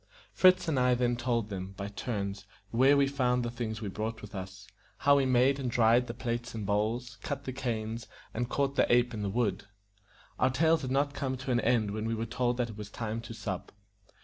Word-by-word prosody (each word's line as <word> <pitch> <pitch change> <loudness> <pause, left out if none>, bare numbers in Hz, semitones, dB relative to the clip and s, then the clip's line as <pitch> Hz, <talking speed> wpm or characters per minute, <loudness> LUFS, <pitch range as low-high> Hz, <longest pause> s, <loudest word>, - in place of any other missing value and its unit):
Fritz 185 -1 +5
and 150 -5 +1
I 125 0 +4
then 120 0 +1
told 120 -3 -1
them, 95 -1 -5
by 100 - -4
turns, 100 -2 -4 0.2
where 135 +5 +5
we 140 - +5
found 125 -3 +1
the 120 - -3
things 115 -2 -4
we - - -3
brought 110 +3 -4
with 105 0 -10
us, 95 0 -7 0.3
how 140 0 +5
we 135 -1 +2
made 130 +2 +4
and 130 -2 -2
dried 120 +1 +4
the 115 - -5
plates 120 0 -3
and 110 -2 -4
bowls, 110 +5 -1
cut 140 0 -4
the 130 - -5
canes, 115 -3 -3 0.3
and 120 +1 -2
caught 140 0 0
the - - +3
ape 120 0 +4
in 105 - -4
the 100 - -1
wood. 100 -3 0 0.7
Our 130 - +4
tales 160 +4 +3
had 130 - -4
not 140 +2 +1
come 130 -2 -2
to 130 0 -4
an 120 - +3
end 115 -4 +2
when 110 +1 -3
we 115 - 0
were 115 +1 -2
told 120 +1 0
that 120 -2 -1
it 105 - -11
was 105 -1 -7
time 110 +1 -4
to 115 0 -8
sup. 95 -5 -5
120 Hz, 230 wpm, -30 LUFS, 110-130 Hz, 0.7 s, Fritz